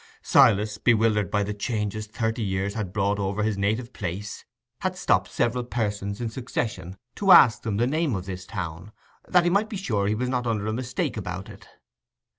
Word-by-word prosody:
Silas, 105 +1 +4
bewildered 110 -4 +3
by 105 0 +1
the 105 +1 -3
changes 105 0 -3
thirty 115 +2 -2
years 95 -1 -1
had 105 -4 -4
brought 100 0 0
over 100 +1 -1
his 110 -1 0
native 110 +5 -1
place, 100 +2 -5 0.4
had - - -2
stopped - - +2
several 120 +1 0
persons 105 -4 -3
in 120 - -2
succession 110 -6 -4 0.2
to 195 -2 +2
ask 125 -11 +8
them 110 -3 -2
the 120 - +2
name 150 -1 0
of 95 -1 -4
this 95 -1 -7
town, 85 -1 -6 0.4
that 180 -1 +4
he 175 - +2
might 205 +3 +2
be 205 - -4
sure 110 - -1
he 105 - +1
was 125 +3 -2
not 125 -1 -1
under 110 -3 -1
a 110 - -1
mistake 125 +2 -2
about - - -5
it. - - -14
105 Hz, 195 wpm, -25 LUFS, 100-120 Hz, 0.4 s, ask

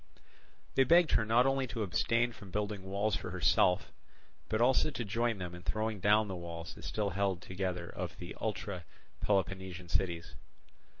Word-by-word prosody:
They 135 - +5
begged 170 +3 +5
her 110 - +3
not 120 +3 +5
only 135 -1 +2
to 115 -1 -3
abstain 115 +5 +1
from 100 -4 -12
building 105 +1 -2
walls 100 +3 0
for 100 - -4
herself, 90 0 +3 0.6
but 110 - +1
also 130 +5 +4
to 125 -5 -4
join 115 +2 0
them 90 -2 -5
in 90 - -8
throwing 110 +2 -2
down 105 +3 +4
the 95 - -4
walls 85 -1 -6
that - - -11
still 105 -2 -1
held 95 -1 0
together 90 -2 -3
of - - -5
the 85 - -7
ultra 100 -5 -3 0.3
Peloponnesian 95 -3 -1
cities. 85 -4 -1
100 Hz, 170 wpm, -33 LUFS, 90-110 Hz, 0.6 s, They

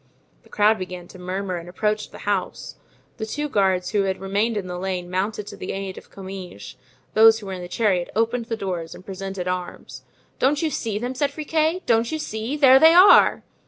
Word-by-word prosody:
The - - -23
crowd 215 0 +3
began 180 -1 -7
to 185 - -13
murmur 185 0 -3
and 170 +1 -9
approached 210 +3 -2
the - - -11
house. 200 -3 -3 0.4
The 220 - -4
two 295 +6 -3
guards 190 -7 +1
who 205 -2 +1
had 190 -1 -2
remained 205 +4 -1
in 200 - -3
the 180 -1 -5
lane 180 -1 -4
mounted 205 +3 -2
to - - -9
the - - -6
aid 195 -1 -5
of - - -13
Comminges; 185 - -9 0.4
those 225 +1 +7
who 215 - -10
were 195 - -5
in 185 - -6
the 175 - -7
chariot 185 -3 0
opened 230 +2 0
the 225 -1 -4
doors 180 -5 -4
and 185 - -14
presented 195 -1 -6
arms. 180 -1 -5 0.4
"Don't 290 +4 +2
you 315 - 0
see 225 -6 -3
them?" 245 +4 -3
cried 280 +2 0
Friquet, 315 +4 -1
"don't 230 -1 +2
you 315 - -1
see? 235 -1 -4
there 265 -2 +7
they 320 +3 +7
are!" 370 +3 +7
205 Hz, 210 wpm, -23 LUFS, 185-230 Hz, 0.4 s, those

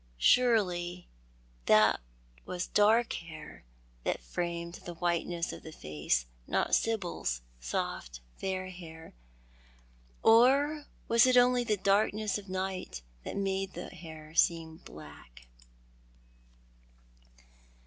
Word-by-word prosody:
Surely 180 - +2 0.6
that 105 -7 +5 0.4
was 180 0 -4
dark 220 +3 +3
hair 160 -3 -9 0.4
that - - -1
framed 170 - -4
the 175 - -7
whiteness 170 0 -1
of - - -9
tho 160 - -10
face, 75 - -1 0.2
not - - 0
Sibyl's 175 - 0 0.2
soft, - - -4 0.2
fair 185 -1 -3
hair. 165 -3 -11 1.1
Or 280 +6 +5 0.2
was 230 +2 +5
it 255 -1 +5
only 245 0 +5
tho 220 -3 +1
darkness 205 +2 +1
of 200 -2 -13
night 185 - -4 0.2
that - - -5
made 195 -1 -1
the 175 - -7
hair 155 -2 -11
seem 165 -1 +2
black 75 - -13
180 Hz, 105 wpm, -31 LUFS, 160-210 Hz, 1.1 s, that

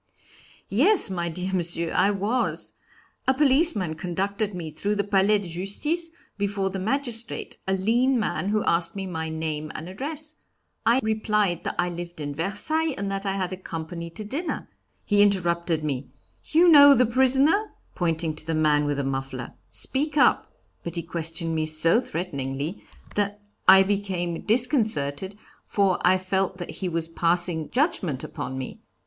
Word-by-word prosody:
"Yes, 300 - +4
my 175 -2 -2
dear 180 +3 -4
Monsieur, 170 -2 -1
I 200 - +3
was. 205 +5 -1 0.5
A 265 - +4
policeman 265 - +3
conducted 195 +5 -2
me 165 -3 -5
through 205 +6 -2
the 200 - 0
Palais 200 +1 +3
de 200 -3 -6
Justice, 205 - -1 0.3
before 200 -1 -1
the 190 - -4
magistrate, 235 +2 -1
a 190 - +1
lean 235 +7 +2
man, 205 -2 -1
who 215 0 +1
asked 170 +1 +1
me 195 -1 -4
my 160 -3 -4
name 155 -1 -4
and 160 - -6
address. 305 - -4 0.5
I 240 +3 +4
replied 210 -4 0
that - - -2
I 175 0 +1
lived 175 -1 -7
in 145 -1 -4
Versailles, 255 - -1
and 200 0 -3
that 195 0 -3
I 195 - 0
had 185 -1 -4
company 170 +1 -6
to 215 +6 -7
dinner; 285 - -4 0.4
he 205 -1 +3
interrupted 170 -5 +1
me, 140 -3 -3 0.4
'You 335 +3 +4
know 285 -3 +9
the 250 - +4
prisoner?' 265 - +2 0.2
pointing 165 -2 -1
to 155 - -7
the 165 - 0
man 150 -1 +3
with 145 -1 -1
the 140 - -1
muffler, 135 -2 -4 0.2
'Speak 295 +3 -1
up.' - - +3 0.3
But 170 0 -6
he 170 - -2
questioned 165 0 -3
me 155 -1 0
so 165 +8 +3
threateningly 150 - -4 0.3
that 205 0 -1 0.3
I 190 +1 +9
became 190 -4 -2
disconcerted, 210 - +1 0.3
for 195 -3 +1
I 185 +1 +4
felt 190 0 -1
that 175 - -6
he 185 - -4
was 165 -1 -1
passing 170 -1 0
judgment 205 - 0
upon 130 - -5
me. 130 - -7
190 Hz, 160 wpm, -25 LUFS, 165-220 Hz, 0.5 s, know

